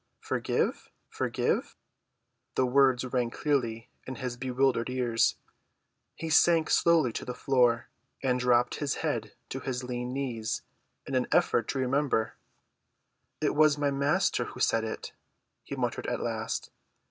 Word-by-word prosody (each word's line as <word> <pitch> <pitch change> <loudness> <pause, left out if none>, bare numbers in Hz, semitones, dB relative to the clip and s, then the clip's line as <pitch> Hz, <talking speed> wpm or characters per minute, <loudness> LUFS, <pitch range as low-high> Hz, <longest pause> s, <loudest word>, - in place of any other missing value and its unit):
"Forgive—forgive!" - - -2 0.8
The 130 - +3
words 130 -1 +3
rang 125 -2 0
clearly 120 -4 -1 0.2
in 130 - -5
his 125 -2 -4
bewildered 125 -1 +1
ears. 125 -3 +1 0.8
He 165 - -5
sank 165 0 +4
slowly 165 -8 +4
to - - -4
the 125 - -5
floor, 125 -2 +2 0.3
and 125 -1 +2
dropped 125 -1 +2
his 145 -2 -1
head 115 -8 -2
to 135 - -4
his 130 -1 -3
lean 125 0 -4
knees 120 -5 -3 0.4
in 135 - -6
an 130 -1 +1
effort 115 - +3
to - - -2
remember. 130 -3 +1 1.1
"It - - +1
was 150 -1 +4
my 145 -1 +1
Master 140 -1 +1
who - - -9
said 115 - +2
it," 110 - -5 0.5
he - - -6
muttered - - -2
at - - -1
last. - - -3
125 Hz, 135 wpm, -29 LUFS, 120-140 Hz, 1.1 s, sank